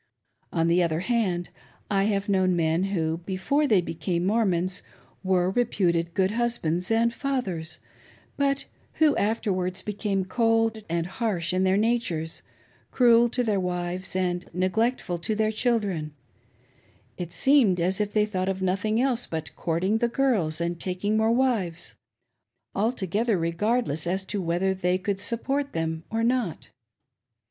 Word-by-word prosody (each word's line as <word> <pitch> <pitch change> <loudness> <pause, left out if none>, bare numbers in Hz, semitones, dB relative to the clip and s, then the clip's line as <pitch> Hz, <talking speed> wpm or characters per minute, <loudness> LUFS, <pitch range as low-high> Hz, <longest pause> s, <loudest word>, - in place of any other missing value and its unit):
On 165 -1 +1
the 170 +2 +3
other 165 -1 0
hand, 190 -6 0 0.4
I 195 -1 +2
have 200 -1 0
known 190 -2 +2
men 165 +2 +1
who, 165 -4 -1
before 190 - 0
they 205 -8 +4
became 170 +1 -2
Mormons, 185 -4 +1 0.4
were 185 -1 +2
reputed 175 -7 0
good 190 -1 +2
husbands 210 -7 -1
and 230 +1 +2
fathers, 235 - -2 0.6
but 275 -1 0 0.3
who 310 -2 +3
afterwards 190 -4 -1
became 200 -2 -2
cold 225 +1 +1
and 170 0 0
harsh 190 -3 -2
in 185 +1 +2
their 190 +1 +3
natures, 205 -8 -1 0.5
cruel 240 -1 +5
to 245 +1 -1
their 210 -4 +1
wives, 180 0 -2
and 180 -1 -1
neglectful 185 +1 0
to 215 +6 -1
their 215 0 +1
children, 205 - -1 0.5
— - - -35
it 175 -1 -4
seemed 250 -10 +3
as 185 +4 +1
if 205 -1 -1
they 210 0 +3
thought 190 -3 -2
of 190 0 -2
nothing 195 +4 0
else 250 -2 0
but 160 -2 -5
courting 185 +6 0
the 235 - +2
girls, 225 -12 +1
and 170 0 -2
taking 190 +4 -1
more 220 +1 +3
wives, 230 -9 0 0.8
altogether 215 0 0
regardless 170 0 0
as 190 +2 -1
to 205 0 -3
^whether 175 +3 0
they 180 -1 +1
could 195 +1 -2
support 270 +7 -2
them 160 0 -2
or 225 +1 -1
not. 235 - -1
190 Hz, 145 wpm, -26 LUFS, 175-225 Hz, 0.8 s, cruel